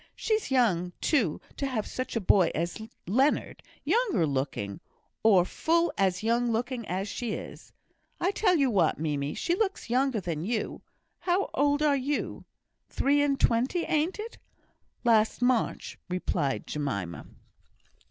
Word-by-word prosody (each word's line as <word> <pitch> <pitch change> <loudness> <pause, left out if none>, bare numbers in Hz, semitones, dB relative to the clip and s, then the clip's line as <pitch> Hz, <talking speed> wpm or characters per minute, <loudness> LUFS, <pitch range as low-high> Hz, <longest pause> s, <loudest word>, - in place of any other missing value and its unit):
She's 435 -1 -1
young, 185 -10 +2
too, 225 - +1 0.2
to 275 - -1
have 230 -6 -2
such 255 -1 -5
a - - +2
boy 185 -3 +4
as 170 +6 -2 0.2
Leonard; 260 - +1 0.2
younger 450 - +2
looking, 130 -8 -3 0.4
or 195 -5 +5
full 335 - +1
as 190 0 +1
young 235 +1 +2
looking 235 0 -2
as 190 +3 -2
she 230 +1 -3
is! - - -8 0.5
I 365 - +1
tell 385 -3 +2
you 275 -5 +3
what, 180 -7 +2
Mimie, 145 -2 -2
she 345 - 0
looks 385 - -1
younger 260 -2 +2
than 165 -4 -3
you. 220 +2 -2 0.4
How 370 +2 0
old 290 +1 +2
are 295 -2 +4
you? 280 +2 -2 0.4
Three 285 +1 +2
and 280 -1 +1
twenty, 255 +9 +2
ain't 315 +4 0
it?" 440 +2 -7 0.6
"Last 225 -2 +3
March," 245 -1 0
replied 165 -6 -1
Jemima. 100 - -4
235 Hz, 145 wpm, -28 LUFS, 180-290 Hz, 0.6 s, or